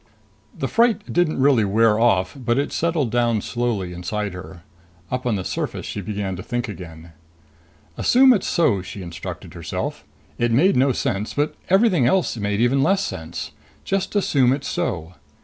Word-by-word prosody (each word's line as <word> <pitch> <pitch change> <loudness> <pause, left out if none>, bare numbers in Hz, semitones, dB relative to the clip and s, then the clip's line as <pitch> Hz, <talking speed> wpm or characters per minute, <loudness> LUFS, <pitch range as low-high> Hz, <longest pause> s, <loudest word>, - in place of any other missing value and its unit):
The 135 - -2
fright 230 - +1
didn't 175 -4 +1
really 130 -4 +4
wear 105 +2 +3
off, 95 -6 +2
but 120 -3 -1
it 140 - 0
settled 160 -8 0
down 120 -2 +2
slowly 115 -8 -2
inside 100 +3 -3
her. 90 -1 -10 0.5
Up 125 0 -2
on 115 - +1
the 95 - -3
surface - - -4
she 100 - -5
began 100 -1 -3
to - - -6
think 120 +4 -3
again. 85 -5 -9 0.9
Assume 260 +1 +6
it's 205 - -1
so, 125 - +2
she 95 +1 -8
instructed 85 -1 -8
herself. - - -4 0.4
It 120 0 +1
made 160 +12 +4
no 135 +2 +4
sense, 105 -3 -2
but 145 +1 0 0.2
everything 190 - +4
else 185 +2 +1
made 105 -2 -2
even 125 +3 +3
less 195 +7 +2
sense. 80 - -5 0.3
Just 195 +1 -2
assume 135 -10 +3
it's 135 0 -4
so. 85 0 -3
120 Hz, 165 wpm, -22 LUFS, 100-145 Hz, 0.9 s, Assume